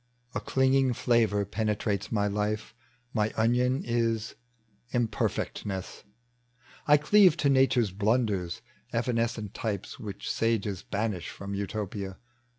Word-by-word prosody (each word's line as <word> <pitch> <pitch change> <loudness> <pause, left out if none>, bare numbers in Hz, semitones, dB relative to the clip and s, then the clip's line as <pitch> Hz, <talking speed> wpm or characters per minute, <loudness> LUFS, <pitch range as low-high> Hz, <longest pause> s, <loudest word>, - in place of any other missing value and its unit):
A - - -1
clinging 130 -1 +2
fl!avor 110 -4 +2
penetrates 105 -1 -1
my 105 -3 +1
life 105 +1 -1 0.2
— 125 0 -38
My 105 0 +2
onion 125 +4 +2
is 115 -1 0 0.6
imperfcctness: 105 -4 -2 0.8
I 150 0 +7
cleave 180 +3 +5
To 145 - +2
nature's 130 -5 +3
blanders, 100 -3 0 0.3
evanescent 115 -3 -1
types 105 -4 -4
Which 100 -3 -7
sages 105 -4 0
banish 105 -3 -2
from 100 0 -7
Utopia. 100 -1 -4
110 Hz, 110 wpm, -28 LUFS, 100-120 Hz, 0.8 s, I